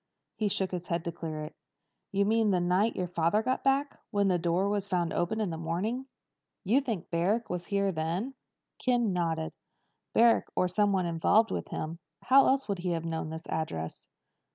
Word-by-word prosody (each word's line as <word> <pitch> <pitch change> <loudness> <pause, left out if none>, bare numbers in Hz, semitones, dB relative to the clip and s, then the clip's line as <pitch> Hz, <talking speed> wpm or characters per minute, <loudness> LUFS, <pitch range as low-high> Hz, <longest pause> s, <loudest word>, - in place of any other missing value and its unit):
He 215 - 0
shook 190 -1 0
his 180 -1 -4
head 170 0 -2
to 170 - -1
clear 155 -2 -5
it. 150 +1 -7 0.6
"You 200 0 +2
mean 220 +1 +3
the 185 -2 +3
night 180 +5 +2
your 185 - -1
father 170 +5 +1
got 255 +2 0
back? 275 +1 +1
When 200 -1 +2
the 180 -1 +2
door 175 +3 +1
was 200 -1 -1
found 175 -3 0
open 175 +6 0
in 205 -5 0
the 160 - -5
morning? 205 +11 -2 0.6
You 235 +9 +3
think 225 -10 -4
Barrack 190 +7 +1
was 180 -1 -4
here 200 -1 +1
then?" 170 +10 -2 0.5
Ken 240 -5 +2
nodded. 165 -2 -1 0.6
"Barrack 230 0 +5
or 180 - +2
somebody 190 -1 +2
involved 200 +7 +3
with - - -3
him. 165 +2 -5 0.2
How 270 +2 +6
else 270 +1 +2
would 200 -3 -2
he 180 0 -1
have 165 0 -3
known 160 -1 -3
this 160 +1 -7
address?" 80 - -4
185 Hz, 190 wpm, -30 LUFS, 170-215 Hz, 0.6 s, How